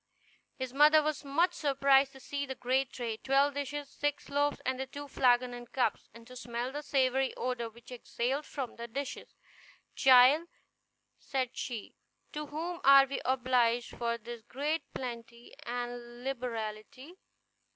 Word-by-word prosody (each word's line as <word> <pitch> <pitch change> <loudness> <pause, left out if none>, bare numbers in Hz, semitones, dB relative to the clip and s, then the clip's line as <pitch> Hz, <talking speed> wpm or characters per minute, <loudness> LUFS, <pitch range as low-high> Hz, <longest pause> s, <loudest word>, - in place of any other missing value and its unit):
His 260 -1 -5
mother 300 +2 +6
was 305 0 -2
much 330 +6 +2
surprised 275 -1 +3
to 270 - -13
see 280 +2 -4
the 265 - -5
great 260 +1 0
tray, 230 -3 -4
twelve 275 +4 +2
dishes, 285 +1 -4
six 290 +1 -3
loaves, 290 +1 +1
the 260 +1 -1
two 285 +2 -8
flagons 250 -2 +2
and 240 -1 -9
cups, 250 -5 -1
and 230 +1 -14
to 250 +2 -13
smell 240 0 -4
the 295 +2 -5
savory 265 -2 +1
odor 245 -2 -2
which 235 +2 -16
exhaled 250 +3 -3
from 265 -4 -5
the 235 0 -6
dishes. 275 +4 -6 0.6
"Child," 265 +5 +6 0.7
said 260 -2 -3
she, 230 -5 -5 0.4
"to 300 0 -4
whom 335 +4 -5
are 275 0 +8
we 275 +1 -4
obliged 245 -2 +1
for 235 -1 -1
this 235 0 -9
great 290 +7 -3
plenty 235 -1 -7
and 240 0 -5
liberality? 250 - -5
260 Hz, 150 wpm, -31 LUFS, 240-280 Hz, 0.7 s, are